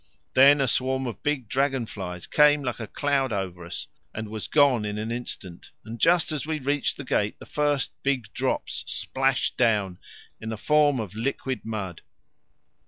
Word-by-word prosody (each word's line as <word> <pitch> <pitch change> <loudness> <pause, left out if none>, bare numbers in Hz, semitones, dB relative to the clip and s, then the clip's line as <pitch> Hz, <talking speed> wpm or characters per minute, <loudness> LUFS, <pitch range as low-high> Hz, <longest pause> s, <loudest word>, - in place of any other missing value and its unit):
Then 140 +2 +7
a 135 - +2
swarm 130 +2 +1
of 120 -4 -5
big 145 -5 -1
dragon 135 0 +1
flies 90 -5 -6
came 150 -1 +4
like 125 -2 -3
a 115 - -5
cloud 140 -1 0
over 95 -4 -3
us, 85 - -6 0.3
and 110 -1 -4
was 105 -4 -5
gone 140 -7 +4
in 105 0 -3
an 110 +2 -3
instant, 105 -7 -6 0.2
and 115 +1 -7
just 170 -1 +4
as 150 -3 -2
we 155 0 -2
reached 145 0 0
the 140 - -6
gate 105 -5 0
the - - -12
first 145 -2 0
big 130 -6 -1
drops - - -1
splashed 135 0 0
down 105 -7 +2 0.4
in 110 - -6
the 110 - -4
form 145 +2 +3
of 105 -4 -5
liquid 130 +1 -3
mud. 100 -6 -4
125 Hz, 175 wpm, -26 LUFS, 105-140 Hz, 0.4 s, Then